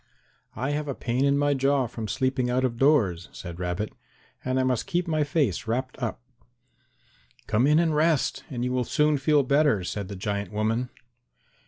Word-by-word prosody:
"I 130 +6 -2
have 150 0 -2
a 140 - -3
pain 125 +3 0
in 140 0 +3
my 145 0 +2
jaw 135 0 +2
from 115 -2 -6
sleeping 130 +2 0
out 130 +1 +1
of 115 -2 -2
doors," 105 - +3
said 85 -1 -8
Rabbit, 90 +4 -3 0.5
"and 130 +1 0
I - - +2
must 130 - 0
keep 180 -2 -1
my 155 -2 +1
face 140 - 0
wrapped 130 +3 -2
up." 120 +1 -3 1.2
"Come 110 +5 +2
in 150 +1 +5
and 165 -2 +2
rest, 155 -3 +1
and 125 -2 -3
you 125 - -1
will 125 0 +1
soon 150 +3 +2
feel 145 +1 +3
better," 140 -7 +3
said 100 +2 -4
the 100 - -7
giant 100 +1 -3
woman. 110 +4 -1
130 Hz, 185 wpm, -26 LUFS, 110-145 Hz, 1.2 s, in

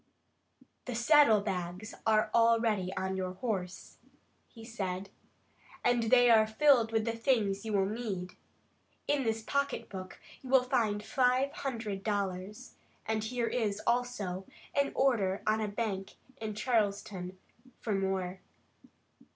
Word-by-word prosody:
"The 250 - -4
saddlebags 215 - +3
are 215 -1 +3
already 230 -5 +3
on 190 0 -1
your 185 -1 -3
horse," 190 -3 -4 0.5
he 225 -2 -13
said, 195 -4 -4 0.7
"and 245 -1 +3
they 245 -1 +6
are 220 -1 +6
filled 235 -1 +4
with 220 -1 +1
the 230 - 0
things 225 -5 +1
you 220 - -3
will 195 -1 +3
need. 200 -4 -4 0.8
In 285 -1 +2
this 225 -2 -1
pocket 280 +4 -1
book 185 -1 -8 0.2
you 260 - -10
will 260 -1 +5
find 215 -4 0
five 255 +3 +2
hundred 225 -9 -4
dollars, 205 +2 -3 0.3
and 220 -1 -1
here 240 +1 -1
is, 215 -4 -1
also, 215 -7 -1 0.3
an 280 0 +1
order 210 -8 +1
on 215 +1 +2
a 215 - -1
bank 200 -2 -3 0.2
in 215 -2 -5
Charleston 200 -5 -1 0.4
for 215 - -2
more. 190 -1 -1
215 Hz, 130 wpm, -31 LUFS, 195-240 Hz, 0.8 s, they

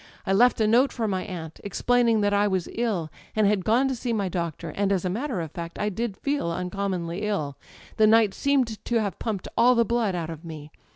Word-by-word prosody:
I 195 - +1
left 245 +5 +4
a 220 - +3
note 240 +6 +4
for 225 -3 -2
my 190 -2 -1
aunt, 165 -4 -7
explaining 230 +2 +2
that 205 0 +2
I 205 +1 +3
was 190 -4 -1
ill 205 -10 -1 0.2
and 215 -1 +3
had 200 -2 +2
gone 235 +6 +3
to 265 - -1
see 240 0 -3
my 200 -4 -1
doctor; 170 -2 -4
and 200 +4 0
as 190 -2 0
a 180 - 0
matter 240 +1 -2
of 160 -3 -6
fact 170 -1 -7
I 210 - 0
did 210 0 -3
feel 280 -12 -1
uncommonly 180 0 -3
ill 190 -10 -2 0.4
â€" - - +5
^the - - +5
night 220 -3 +5
seemed 255 -7 0
to 240 - -2
have 205 -3 -3
pumped 210 -5 -3
all 245 +2 +5
the 235 0 +3
blood 225 -4 0
out 165 -2 -3
of 160 0 -9
me. 155 -2 -9
205 Hz, 235 wpm, -25 LUFS, 180-230 Hz, 0.4 s, â€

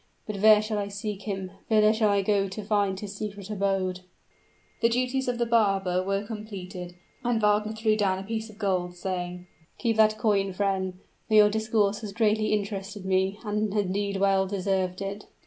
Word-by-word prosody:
But 210 -2 -4
where 215 +1 +7
shall 215 -1 -2
I 200 - -2
seek 200 0 -5
him? 190 -2 -3 0.2
whither 215 -1 +5
shall 220 -1 +2
I 200 -1 +2
go 200 0 +2
to 195 +3 -6
find 200 -2 +1
his 205 -1 -7
secret 205 -1 -6
abode?" 195 -2 0 0.8
The 230 - +4
duties 255 +2 0
of 245 -1 0
the 235 - +1
barber 195 -6 +2
were 195 +2 -1
completed; 190 -5 -7 0.3
and 240 -2 +1
Wagner 210 0 +2
threw 220 0 +1
down 195 -3 +1
a 190 - -5
piece 220 +2 -4
of 210 - -14
gold, 185 -4 -1
saying, 180 -1 -4 0.3
"Keep 230 -3 0
that 215 0 +4
coin, 200 -3 +1
friend, 190 -1 -1 0.3
for 215 - +2
your 210 -1 +7
discourse 220 -1 +1
has 210 -3 -6
greatly 215 0 +2
interested 200 -1 -3
me, 190 +1 +1
and 210 0 -1
has 205 -1 +2
indeed 200 +1 -1
well 195 0 +3
deserved 190 -1 -1
it." 200 +1 -6
205 Hz, 185 wpm, -27 LUFS, 190-215 Hz, 0.8 s, where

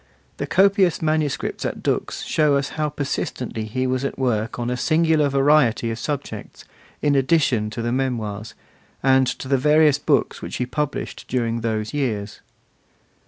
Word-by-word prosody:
The - - -3
copious 195 -2 +3
manuscripts 155 -2 -1
at - - -4
Dux - - -1
show 150 -2 +2
us 140 0 0
how 155 -1 -2
persistently 130 -5 -3
he 130 +4 -2
was 130 +1 -1
at 140 - -3
work 115 -4 -1
on 120 0 -2
a - - 0
singular 155 +1 +2
variety 135 -4 +3
of 115 - -5
subjects, 145 +1 -5 0.4
in 145 -1 +3
addition 135 -6 +2
to 115 +2 -5
the 120 - -1
Memoirs, 110 -5 -3 0.5
and 130 -1 +4
to 130 - -4
the 135 -1 +2
various 150 +1 +4
books 145 -1 +1
which - - -6
he 125 - -1
published 150 +3 -4
during 115 -2 -1
those 110 0 -2
years. 110 -8 -2
130 Hz, 160 wpm, -22 LUFS, 115-150 Hz, 0.5 s, and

